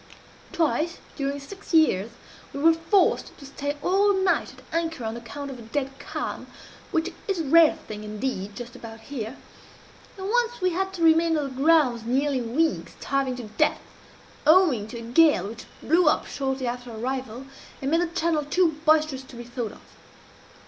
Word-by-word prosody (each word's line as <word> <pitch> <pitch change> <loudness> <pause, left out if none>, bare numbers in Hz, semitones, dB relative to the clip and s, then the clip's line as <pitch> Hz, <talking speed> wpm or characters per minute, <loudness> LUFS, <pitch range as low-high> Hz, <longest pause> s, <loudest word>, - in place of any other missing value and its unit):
Twice, 335 +1 0 0.2
during 280 0 -2
six 380 +5 -6
years, 225 -10 +4 0.4
we 280 - -5
were 325 +3 +6
forced 330 +4 +1
to 280 - -12
stay 285 +1 -4
all 400 +2 +3
night 380 -1 +1
at - - -16
anchor 330 -5 -1
on 220 +1 -3
account 270 +4 -7
of 255 - -9
a - - -9
dead 265 +4 -3
calm, - - -5 0.4
which 325 +1 -1
is 390 -3 0
a - - -2
rare 320 +2 +6
thing 210 0 -7
indeed 210 -2 -4
just 240 +1 -8
about 225 -1 -10
here; 245 -1 -6 0.8
and 380 0 -5
once 485 +2 +1
we 365 0 +1
had 380 +2 -1
to 345 -3 -3
remain 325 0 +5
on 300 - 0
the 275 - -3
grounds 290 -8 +4
nearly 265 +3 +1
a - - -3
week, 300 +8 0
starving 275 -2 -1
to 250 - -7
death, 215 0 0 0.7
owing 310 - +5
to 235 - -8
a - - -7
gale 245 - +4
which 230 +2 -9 0.2
blew 335 +2 +3
up - - +3
shortly 265 -1 -3
after 245 0 -4
our 225 - -8
arrival, 255 +1 -4 0.3
and 270 +1 -2
made 330 +1 +3
the 350 - +1
channel 330 -2 0
too 315 +1 +1
boisterous 310 -3 +3
to 265 -1 -14
be 240 - -7
thought 240 -2 -5
of. - - -15
285 Hz, 185 wpm, -25 LUFS, 240-330 Hz, 0.8 s, were